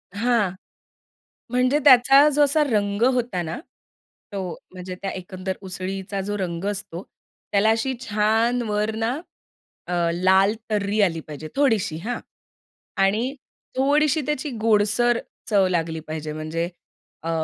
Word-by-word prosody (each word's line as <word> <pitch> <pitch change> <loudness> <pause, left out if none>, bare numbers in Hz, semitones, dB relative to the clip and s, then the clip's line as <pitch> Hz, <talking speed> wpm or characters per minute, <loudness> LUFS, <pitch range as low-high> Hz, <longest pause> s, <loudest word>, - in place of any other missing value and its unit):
हां, 225 -4 +2 1.0
म्हणजे 255 +4 +2
त्याचा 270 +2 +8
जो 295 0 +3
असा 300 +2 +3
रंग 205 -1 0
होता 235 -8 -1
ना. 160 +8 -5 0.7
तो 190 -3 -3 0.2
म्हणजे 185 0 -7
त्या 195 - -2
एकंदर 185 0 -5
उसळीचा 190 +1 -5
जो 205 0 -2
रंग 175 -1 -3
असतो, 200 -3 -6 0.5
त्याला 205 +2 +3
अशी 225 +4 +1
छान 225 +2 +1
वर 210 +1 0
ना 230 +5 -1 0.7
अ, 180 - -3 0.2
लाल 190 +3 +4 0.2
तर्री 210 0 0
आली 170 -4 +2
पाहिजे 155 +1 -7
थोडीशी, 225 - +2
हां 235 +9 -4 0.8
आणि 220 +7 +1 0.4
थोडीशी 295 +3 +3
त्याची 300 -1 -2
गोडसर 225 +2 +3 0.3
चव 200 -3 +4
लागली 165 -2 -1
पाहिजे. 155 -1 -4
म्हणजे 160 +2 -3 0.5
अ, 165 - -3
205 Hz, 125 wpm, -23 LUFS, 185-240 Hz, 1.0 s, त्याचा